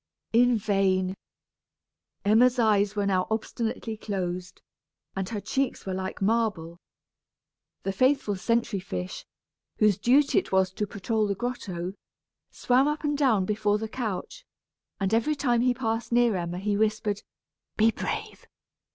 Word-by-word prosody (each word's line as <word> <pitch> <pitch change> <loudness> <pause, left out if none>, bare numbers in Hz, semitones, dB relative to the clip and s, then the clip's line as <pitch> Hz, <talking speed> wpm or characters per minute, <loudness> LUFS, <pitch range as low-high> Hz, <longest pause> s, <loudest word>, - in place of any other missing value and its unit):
In 245 +1 +5
vain! 190 -3 +1 1.1
Emma's 240 +5 +5
eyes 210 -3 +3
were 205 -1 0
now 185 -2 +1
obstinately 225 0 -3
closed, 185 -4 -4 0.6
and 190 -1 -3
her 220 - -3
cheeks 265 +5 -2
were 190 - -3
like 190 +1 -4
marble. 200 -6 0 1.0
The 195 - -1
faithful 255 0 +2
sentry 230 +1 0
fish, 90 - -6 0.5
whose 210 -3 +3
duty 275 +4 +4
it - - -8
was 190 -1 +3
to 210 +2 -3
patrol 215 +2 -1
the 200 - -1
grotto, 190 -6 -4 0.6
swam 255 +3 +2
up 300 +2 -2
and 295 -1 0
down 245 -10 +3
before 210 0 +1
the 220 +1 -4
couch, 225 - -5 0.6
and 195 +1 0
every 235 +7 +2
time 245 -4 +1
he 250 +1 +3
passed 230 -2 -2
near 240 -2 +4
Emma 175 -1 -3
he 205 +2 -1
whispered, 215 -1 0 0.6
"Be 220 +1 +5
brave. - - -5
215 Hz, 140 wpm, -27 LUFS, 190-240 Hz, 1.1 s, In